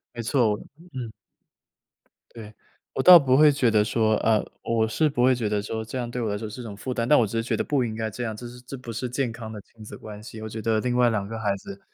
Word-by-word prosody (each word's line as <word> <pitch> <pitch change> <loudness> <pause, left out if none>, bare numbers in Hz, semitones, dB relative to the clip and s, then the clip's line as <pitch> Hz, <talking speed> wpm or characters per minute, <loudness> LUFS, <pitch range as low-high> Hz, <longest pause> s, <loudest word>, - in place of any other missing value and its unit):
没 120 - -4
错， 115 -4 +1 0.3
嗯。 125 -4 -5 1.2
对。 110 -2 -10 0.4
我 - - -1
倒 180 -1 +10
不 130 -4 +3
会 150 +1 +7
觉 125 -5 +2
得 105 -1 +3
说 110 -1 +2
呃， 110 -2 +2 0.2
我 115 -1 +1
是 135 +8 +1
不 130 -4 0
会 130 +1 +5
觉 120 -3 -2
得 105 0 0
说 110 +2 -4
这 110 +4 -6
样 120 -1 -4
对 125 0 -3
我 110 - -1
来 105 - -2
说 110 0 -6
是 115 +4 -8
种 110 -4 -7
负 130 +5 -5
担， 115 -1 -1
但 150 - +6
我 120 - +4
只 110 +2 -4
是 115 - 0
觉 115 - -1
得 - - -1
不 135 -4 0
应 110 -1 -4
该 110 -1 -2
这 120 +3 -5
样， 110 -2 -4
这 120 - -9
是 125 0 -12
这 125 +2 -8
不 125 -2 -8
是 115 +3 -3
健 125 -1 -1
康 115 -1 -8
的 105 -2 -8
亲 110 +2 -21
子 - - -9
关 105 -1 -10
系。 110 0 -10
我 110 - -6
觉 110 +1 -6
得 110 0 +1
另 125 -1 -1
外 125 -1 +5
两 105 -3 -1
个 110 +2 -6
孩 105 -3 0
子， 195 - -10
115 Hz, 305 characters per minute, -25 LUFS, 110-125 Hz, 1.2 s, 倒